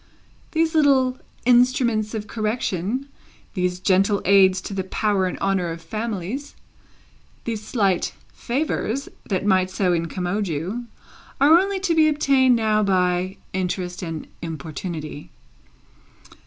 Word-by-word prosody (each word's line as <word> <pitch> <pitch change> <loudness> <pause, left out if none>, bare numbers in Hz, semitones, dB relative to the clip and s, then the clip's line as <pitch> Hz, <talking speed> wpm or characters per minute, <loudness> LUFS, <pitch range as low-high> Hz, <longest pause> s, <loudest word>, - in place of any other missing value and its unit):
These 320 0 +1
little 270 -4 +3 0.3
instruments 240 -3 +3
of 210 -1 -4
correction, 215 +2 -2 0.5
these 180 -2 -1
gentle 195 +2 +3
aids 190 -1 +5
to 200 - -6
the 190 -1 -2
power 200 -1 +1
and 180 - -4
honour 195 -3 0
of 165 0 -5
families, 215 - -4 0.9
these 225 -2 -3
slight 200 -5 0 0.2
favours 270 -1 -2 0.2
that 195 -1 -1
might 185 -2 +3
so 185 -1 +1
incommode 180 +4 -1
you, 180 +10 -3 0.5
are 305 +5 +7
only 390 +1 -1
to 365 -3 +1
be 315 -1 +5
obtained 275 -4 +4
now 215 -2 +2
by 185 -1 +1 0.2
interest 180 0 -2
and 165 -3 -5 0.2
importunity. 155 -1 -6
200 Hz, 120 wpm, -23 LUFS, 180-250 Hz, 0.9 s, are